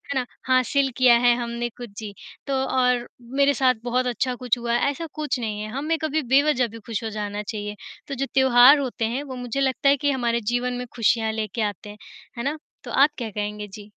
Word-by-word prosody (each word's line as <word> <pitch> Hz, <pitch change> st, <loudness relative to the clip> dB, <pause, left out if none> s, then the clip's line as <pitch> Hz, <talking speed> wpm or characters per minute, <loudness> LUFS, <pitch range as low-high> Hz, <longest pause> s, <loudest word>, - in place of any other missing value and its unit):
ना? 255 Hz, -, 0 dB, 0.2 s
हासिल 260 Hz, +2 st, +2 dB
किया 255 Hz, -2 st, +6 dB
है 240 Hz, -, +7 dB
हमने 235 Hz, 0 st, -3 dB
कुछ, 240 Hz, -3 st, -8 dB
जी। 210 Hz, -2 st, -6 dB, 0.3 s
तो 275 Hz, -, -1 dB
और 250 Hz, -1 st, +1 dB, 0.3 s
मेरे 280 Hz, 0 st, +5 dB
साथ 255 Hz, -2 st, +3 dB
बहुत 250 Hz, +1 st, 0 dB
अच्छा 250 Hz, +1 st, -1 dB
कुछ 250 Hz, -1 st, 0 dB
हुआ 235 Hz, 0 st, -2 dB
है, 240 Hz, +3 st, +2 dB
ऐसा 330 Hz, +3 st, -6 dB
कुछ 300 Hz, -4 st, -2 dB
नहीं 210 Hz, -2 st, -3 dB
है, 215 Hz, -, -5 dB
हम 275 Hz, +4 st, -4 dB
में 325 Hz, +1 st, +1 dB
कभी 310 Hz, 0 st, 0 dB
बेवजह 275 Hz, -3 st, +4 dB
भी 230 Hz, +1 st, -11 dB
खुश 225 Hz, -1 st, -3 dB
हो -, -, -2 dB
जाना 210 Hz, -1 st, -4 dB
चाहिए। 210 Hz, -1 st, -5 dB, 0.3 s
तो 275 Hz, -, -4 dB
जो 275 Hz, -, -1 dB
त्योहार 265 Hz, +1 st, +7 dB
होते 250 Hz, -4 st, -2 dB
हैं 285 Hz, -, -2 dB
वो 265 Hz, -3 st, -7 dB
मुझे 245 Hz, +1 st, -4 dB
लगता 270 Hz, +1 st, +2 dB
है 280 Hz, -, +4 dB
कि 285 Hz, +1 st, +1 dB
हमारे 235 Hz, -3 st, 0 dB
जीवन 250 Hz, 0 st, 0 dB
में 245 Hz, 0 st, -4 dB
खुशियाँ 225 Hz, -1 st, +2 dB
लेके 220 Hz, 0 st, -3 dB
आते 205 Hz, 0 st, -3 dB
हैं। 210 Hz, -, -10 dB, 0.4 s
है 235 Hz, -, -3 dB
ना? 285 Hz, +3 st, -1 dB, 0.3 s
तो -, -, -8 dB
आप 280 Hz, +3 st, +5 dB
क्या 235 Hz, -3 st, -4 dB
कहेंगे? 210 Hz, 0 st, -4 dB
जी। 205 Hz, +1 st, -11 dB
245 Hz, 225 wpm, -24 LUFS, 225-270 Hz, 0.4 s, है